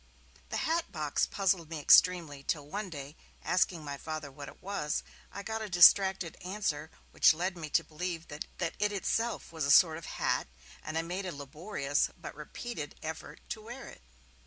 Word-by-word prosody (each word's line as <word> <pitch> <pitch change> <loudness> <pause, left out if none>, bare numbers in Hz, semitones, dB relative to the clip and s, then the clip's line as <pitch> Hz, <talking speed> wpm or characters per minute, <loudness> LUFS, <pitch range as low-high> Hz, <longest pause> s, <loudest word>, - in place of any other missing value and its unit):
The - - -2
hat 330 +1 0
box 150 -4 0
puzzled 190 -5 +1
me 160 -2 -4
extremely, 160 -2 +5
till 145 +1 -2
one 200 +5 -4
day, 145 -2 -8 0.3
asking 180 -1 +1
my 140 -1 -4
Father 155 -3 -5
what 140 +1 -9
it - - -12
was, 180 -6 -2 0.3
I 200 - -7
got 220 +1 -3
a 215 - -4
distracted 180 -1 +6
answer 180 -6 -2 0.2
which - - +6
led 180 +3 -1
me 160 -3 -6
to - - +3
believe 165 +1 -5
that 150 +1 -5
it 170 -2 -2
was 210 0 +3
itself 215 0 -1
a 155 -3 -1
sort 160 +1 +6
of 165 - -11
hat, - - 0 0.3
and 155 +1 -4
I 165 - +1
made 185 +3 -4
a - - -3
laborious 145 +1 -1
but - - -7
repeated 150 +2 -6
effort 160 0 -6
to 220 - -4
wear 240 +5 -9
it. - - -14
165 Hz, 185 wpm, -31 LUFS, 150-195 Hz, 0.3 s, distracted